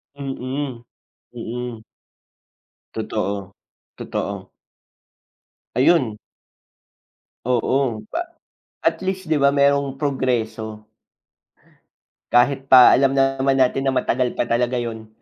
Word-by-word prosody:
Mm, 135 -2 -5 0.5
mm. 120 0 -6 1.1
Totoo, 100 -1 -4 0.4
totoo. 100 -1 -5 1.2
Ayun. 125 -5 +3 1.3
Oo, 125 -2 0
pa 340 - 0 0.6
at - - 0
least, 190 0 -3
'di 155 - +2
ba, 140 0 +4
merong 140 -1 +2
progreso. 110 -6 -2 1.4
Kahit 135 +2 +2
pa, 125 -1 +9
alam 135 0 +3
naman 135 0 +2
natin 130 +1 +2
na 135 - +1
matagal 125 -1 0
pa - - +1
talaga 120 +1 0
'yon. 110 -2 -6
130 Hz, 90 wpm, -21 LUFS, 115-140 Hz, 1.4 s, pa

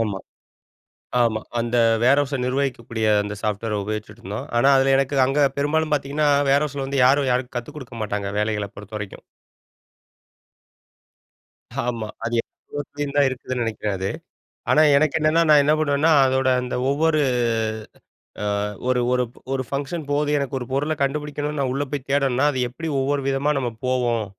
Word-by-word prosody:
ஆமா. 105 -4 -1 1.0
ஆமா. 110 -2 +1 0.2
அந்த 120 +1 -1 0.3
வேர்ஹவுஸ 140 +3 +3
நிர்வகிக்கக்கூடிய 125 -4 -1 0.2
அந்த 105 0 -5
சாஃப்ட்வேர 105 0 -2
உபயோகிச்சிட்டுருந்தோம். 110 +3 -6
ஆனா, 135 - +4
அதில 135 0 +3
எனக்கு 135 +1 0
அங்க 140 +1 +3
பெரும்பாலும் 155 +2 0
பார்த்தீங்கன்னா, 145 +1 0 0.2
வேர்ஹவுஸில 140 0 +1
வந்து 135 0 0
யாரும், 135 0 +3
யாரும் 125 0 -1
கத்துக் 120 +5 -9
குடுக்கமாட்டாங்க. 105 -6 -4
வேலைகள 105 -1 -1
பொறுத்தவரைக்கும். 100 0 -8 2.6
ஆமா 115 -3 -3 0.2
அது 120 - -2
எல்லா 145 - -10
எடத்துலயும் 145 0 -5
தான் 145 -1 +5
இருக்குதுன்னு 130 -1 -4
நினைக்கிறேன் 110 -2 -2
அது, 95 +1 -2 0.6
ஆனா, 155 - +5
எனக்கு 155 +2 +3
என்னன்னா, 155 +2 +3
நான் 150 -1 +7
என்ன 150 +2 +3
பண்ணுவேன்னா, 150 +1 +2 0.2
அதோட 130 0 +1
அந்த 125 0 -4
ஒவ்வொரு 155 +2 +2 1.2
ஆ - - -1 0.4
ஒரு 125 -1 +2
ஒரு 125 0 +2 0.3
ஒரு 130 -1 -1
ஃபங்க்ஷன் 145 +3 -3
போகுது. 145 +1 +1
எனக்கு 140 -1 -2
ஒரு 125 - -5
பொருள 145 +4 0
கண்டுபிடிக்கணுன்னு 150 +1 -2
நான் 135 -2 0
உள்ள 140 +2 -1
போய் 140 -3 -4
தேடணுன்னா, 135 -1 +2
அது 130 - -3
எப்பிடி 160 +6 -6
ஒவ்வொரு 140 +1 0
விதமா 135 +2 +1
நம்ம 125 -3 -1 0.2
போவோம்? 120 -3 0
135 Hz, 145 wpm, -22 LUFS, 120-145 Hz, 2.6 s, நான்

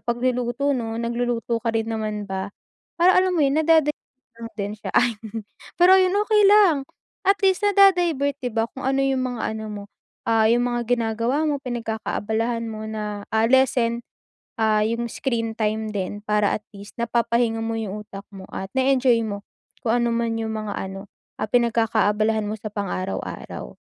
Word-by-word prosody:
pagluluto, 245 +3 0
'no? 225 -3 -3
Nagluluto 235 0 -1
ka 235 - -2
rin 225 0 -1
naman 215 -2 -3
ba? 190 0 -4 0.5
Para 360 +1 +5
alam 370 0 +3
mo - - +2
yun, 275 +1 +2
nada-divert 315 -2 +3 0.4
natin 215 -3 -5
siya. 215 - -6
Ayun. 225 -2 0 0.4
Pero 360 +2 +8
ayun, 370 -1 +3
okey 425 -1 +4
lang, 405 -6 +6 0.5
at 395 +1 +4
least, 380 +1 +3
nada-divert, 355 -9 +4
'di 245 - -1
ba, 225 0 +1
kung 265 - -8
ano 270 +1 +1
yung 265 -1 +1
mga - - -6 0.2
ano 220 - -6
mo, 205 -1 -6 0.4
ah, 225 -1 +4
yung 240 +1 +3
mga 240 0 -1
ginagawa 235 +4 +1
mo, 290 -2 -1
pinagkakaabalahan 230 -1 -2
mo 215 -1 -6
na, 210 -1 -4
ah, 220 0 +2
lessen, 240 -2 +2 0.6
ah, 215 -1 +3
yung 230 +2 -1
screen 230 -2 -2
time 220 0 -1
din 205 +1 -3
para 210 -1 +2
at 210 - -26
least, 200 +3 -12
napapahinga 235 -1 +1
mo 225 0 -2
yung 210 -1 -5
utak 200 -1 -10
mo 195 -1 -9
at 190 - -5
na-e-enjoy 260 -3 +3
mo 200 -1 -5 0.4
kung 225 - 0
ano 235 - +1
man 230 -1 0
yung 220 0 -3
mga 215 -2 -4
ano, 195 +1 -6 0.4
ah, 215 - -2
pinagkakaabalahan 220 -2 +2
mo - - -2
sa 215 0 -6
pang-araw-araw. 195 -2 -5
230 Hz, 170 wpm, -23 LUFS, 215-260 Hz, 0.6 s, Pero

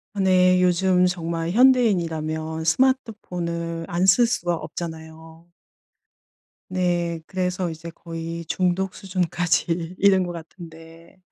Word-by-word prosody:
아 - - -4
네 185 -1 +4
요즘 180 0 +3
정말 165 -2 -3
현대인이라면 165 -10 +2
스마트폰을 170 -7 -1
안 175 +2 +1
쓸 235 +6 +5
수가 175 -8 -1
없잖아요. 160 0 -8 1.2
네. 175 -2 -1
그래서 185 -1 -2
이제 165 +1 -8
거의 165 0 -7
중독 185 +2 -1
수준까지 175 -2 -1
이른 195 -2 +4
것 175 - -5
같은데 165 0 -12
175 Hz, 240 characters per minute, -23 LUFS, 165-185 Hz, 1.2 s, 쓸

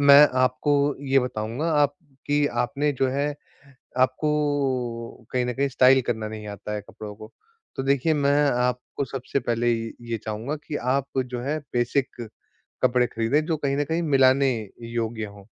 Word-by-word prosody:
मैं 140 +1 +9
आपको 140 +3 +2 0.2
ये 135 - +6
बताऊँगा, 125 +5 -2
आपकी 145 -1 0
आपने 140 +4 0
जो 135 -1 0
है 140 +2 0 0.7
आपको 130 -5 0
कहीं 125 -1 +1
न 125 - -1
कहीं 140 +2 +1
स्टाइल 130 +1 +5
करना 110 -2 -2
नहीं 105 -1 -7
आता 105 +1 -6
है 105 - -2
कपड़ों 105 0 -9
को। 110 +1 -12 0.4
तो - - -2
देखिए, 140 +3 +2
मैं 145 0 +3
आपको 125 +2 -1
सबसे 135 +1 -3
पहले 120 -1 +1
ये 115 0 -3 0.2
ये 115 - 0
चाहूँगा 110 +7 -3
कि 150 - -3
आप 130 +1 0
जो 125 -1 -2
हैं 145 +4 -1 0.2
बेसिक 120 -1 -1 0.5
कपड़े 125 -1 +3
खरीदें, 120 +7 0
जो 165 - 0
कहीं 140 -2 -1
न 145 - +1
कहीं 165 +4 -1
मिलाने 135 -3 +4 0.4
योग्य 115 -1 -2
हों। 100 -1 -13
130 Hz, 160 wpm, -25 LUFS, 120-145 Hz, 0.7 s, मैं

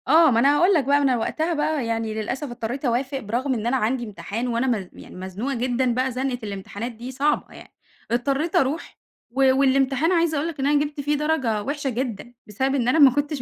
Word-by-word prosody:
آه، 315 +1 +6
ما 230 - +3
أنا 280 +4 +4
هاقول 360 +5 +4
لك 315 -6 +3
بقى 280 +2 +3
ما 290 - +1
أنا 260 -3 +3
وقتها 315 +9 -1
بقى 295 -3 0
يعني 225 -1 -2
للأسف 220 +7 -3
اضطرّيت 240 +3 -5
أوافق 260 +3 0
برغم 250 +5 -2
إن 230 -2 -2
أنا 265 +2 +2
عندي 240 +2 0
امتحان، 215 +3 -5
وأنا 240 +2 0
م 210 -7 -1
يعني - - -13
مزنوقة 190 +9 -4
جدًا 245 +1 0
بقى 255 +2 0
زنقة 255 0 -2
الامتحانات 205 +3 -5
دي 240 +3 -8
صعبة 285 +3 -1
يعني، - - -14 0.4
اضطريت 275 +7 0
أروح 275 +5 0 0.3
و 265 +1 +4
والامتحان 275 +3 +2
عايزة 335 -3 +2
أقول 290 +3 -1
لك 325 -4 -6
إن 270 - +1
أنا 290 0 +3
جِبت 290 0 -6
فيه 295 +1 0
درجة 270 -9 0
وحشة 285 +1 -2
جدًا 240 -2 -4
بسبب 265 +6 -1
إن 245 -3 0
أنا 260 +6 +3
ما 280 -3 +8
كنتش 290 +1 -2
260 Hz, 220 wpm, -23 LUFS, 235-285 Hz, 0.4 s, ما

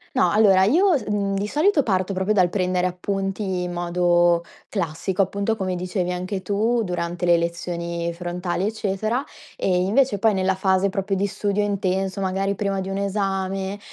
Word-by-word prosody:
No, 260 - +4
allora 195 -3 +5
io, 355 - +4
mhmm, 200 -1 0
di 200 +1 -1
solito 300 - +2
parto 190 -3 0
proprio 190 +3 0
dal 180 -3 +4
prendere 180 -1 0
appunti 190 0 -2
in 175 - -4
modo 175 0 +2 0.2
classico, 185 +1 -2
appunto 200 +3 0
come 190 -3 -2
dicevi 180 0 -2
anche 185 +2 -3
tu 220 +5 +1
durante 175 -1 -3
le 175 -1 +5
lezioni 170 0 -3
frontali, 175 +1 -3
eccetera. 215 +4 -1 0.3
E 185 - 0
invece 225 +2 +2
poi 220 0 +3
nella 190 0 +1
fase 190 0 +2
proprio 195 0 -2
di 200 +2 0
studio 205 +1 -1
intenso, 190 -1 -1
magari 195 +1 -1
prima 195 -1 -1
di 190 - -5
un 195 - -3
esame, 195 0 -2
190 Hz, 165 wpm, -23 LUFS, 180-205 Hz, 0.3 s, allora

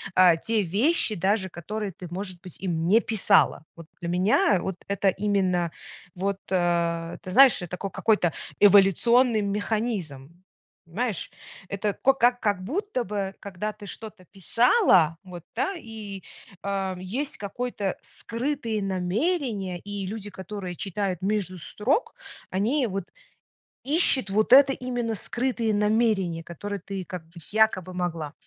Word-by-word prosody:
а, 180 -3 +6
те 225 +4 0
вещи, 215 - +2
даже 190 +1 0
которые 200 +4 -5
ты, 180 +1 -10
может 185 -1 -5
быть, 180 -4 -9
им 170 -3 -1
не 220 +6 +5
писала. 210 -8 +2
Вот 165 -2 -12
для 170 - -5
меня 180 +1 +3
вот 190 -1 -4
это 200 0 +1
именно, 185 -4 0 0.4
вот, 195 +2 -2
э, 170 -2 0
ты 185 - -7
знаешь, 265 -1 +7
э, 175 - -5
такой 180 +2 -5
какой-то 180 -4 +2 0.3
эволюционный 210 +4 +5
механизм. 200 - -3 0.4
Понимаешь? 205 +3 -3 0.4
Это 200 +1 -1
ко 270 - +3
как 245 -1 +2
как 205 -3 0
будто 285 - -2
бы, 195 -2 -3
когда 200 +2 -4
ты 210 0 -12
что-то 210 -2 -8
писала, 190 - +3
вот, 180 -3 -10
да? 390 - -1
И, 215 - -8 0.4
а, 195 -2 -2
есть 240 +11 -4
какой-то 205 -1 -3
скрытые 230 -3 -3
намерения, 195 - -1
и 205 +1 -5
люди, 205 +1 -6
которые 190 -2 -7
читают 195 -1 -3
между 195 -2 -1
строк, 225 - -1 0.3
они 235 +9 +1
вот 195 -1 -4 0.8
ищут 275 - +4
вот 215 +4 +1
это, 270 0 +8
именно 245 -3 -3
скрытые 235 +1 -1
намерения, 210 -5 +1
которые 200 +4 -6
ты 195 +1 -5
как 180 -3 -7
бы 170 +1 -13
якобы 210 -4 +2
могла. 165 -4 -3
200 Hz, 135 wpm, -26 LUFS, 180-225 Hz, 0.8 s, это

